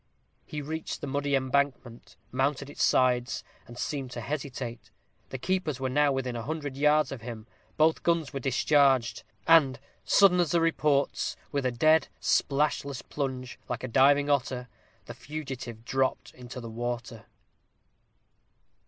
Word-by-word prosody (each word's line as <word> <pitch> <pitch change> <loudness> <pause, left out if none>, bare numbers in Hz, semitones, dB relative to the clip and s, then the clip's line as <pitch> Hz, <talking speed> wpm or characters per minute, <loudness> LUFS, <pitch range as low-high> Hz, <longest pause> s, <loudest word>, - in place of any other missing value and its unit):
He 150 -1 -5
reached 160 +2 -4
the - - -3
muddy 140 0 0
embankment; 130 -2 -1 0.2
mounted 140 +2 -1
its - - -6
sides; 125 -1 +2 0.2
and 120 +1 -11
seemed 135 -1 -3
to 120 - -5
hesitate. 130 -2 -5 0.4
The 130 - -5
keepers 155 -2 -1
were 130 -1 -2
now 145 +1 +3
within 130 -2 -2
a 115 - -3
hundred 145 +1 -4
yards 150 +2 +3
of 135 -4 -6
him. 115 -2 -7 0.3
Both 160 +1 +3
guns 165 -4 0
were 135 - -2
discharged. 135 -1 +3 0.2
And, 140 -7 +5 0.2
sudden 190 -3 +5
as 175 -3 +2
the 170 - +4
reports, 150 -4 +1 0.2
with 140 -3 0
a - - 0
dead, 155 +6 +4
splashless 140 -2 0
plunge, 130 -3 -4
like - - -3
a - - -2
diving 140 +3 +4
otter, 130 -3 0 0.4
the - - -8
fugitive 130 -6 -7
dropped 130 0 -1
into 125 0 -9
the 115 -2 -7
water. 120 -1 -5
135 Hz, 145 wpm, -28 LUFS, 125-150 Hz, 0.4 s, And